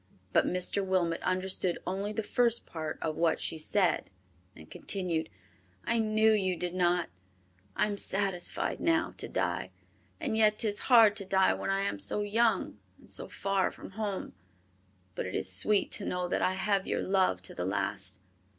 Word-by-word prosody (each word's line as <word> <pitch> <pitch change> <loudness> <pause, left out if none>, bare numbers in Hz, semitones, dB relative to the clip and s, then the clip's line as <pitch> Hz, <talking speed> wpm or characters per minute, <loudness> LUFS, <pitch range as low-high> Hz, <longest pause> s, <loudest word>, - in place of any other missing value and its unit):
But - - +4
Mr. 180 +2 +1
Wilmot 180 -3 0
understood 185 -1 0
only 195 +3 -2
the 220 +1 -3
first 235 +2 +1
part 155 -2 -5
of 155 -1 -2
what 165 -1 +2
she 160 - -2
said, 185 +3 +1 0.5
and 80 - -13
continued, 175 - -2 0.6
"I 230 - +1
knew 220 0 +3
you 190 -4 +1
did 175 0 -3
not, 175 -1 +1 0.7
I - - +3
am 205 -1 -3
satisfied 195 -3 0
now 330 -1 +1
to - - -5
die; - - -2 0.5
and 275 -9 -2
yet 215 -1 +4
'tis 210 -2 -1
hard 225 -4 +7
to 200 - -3
die 190 0 +3
when - - -4
I 195 0 +1
am 195 - -1
so 100 - +1
young 210 - +1 0.2
and - - -14
so 95 - 0
far 195 -1 0
from - - -11
home, 205 -1 -4 0.8
but - - -4
it 95 - -5
is 95 - 0
sweet 205 - +3
to 200 - -5
know 180 0 -2
that - - -1
I 185 - +1
have 195 0 +1
your - - -1
love 185 - +1
to - - -4
the 90 - -4
last. 95 -1 -2
190 Hz, 180 wpm, -30 LUFS, 170-210 Hz, 0.8 s, hard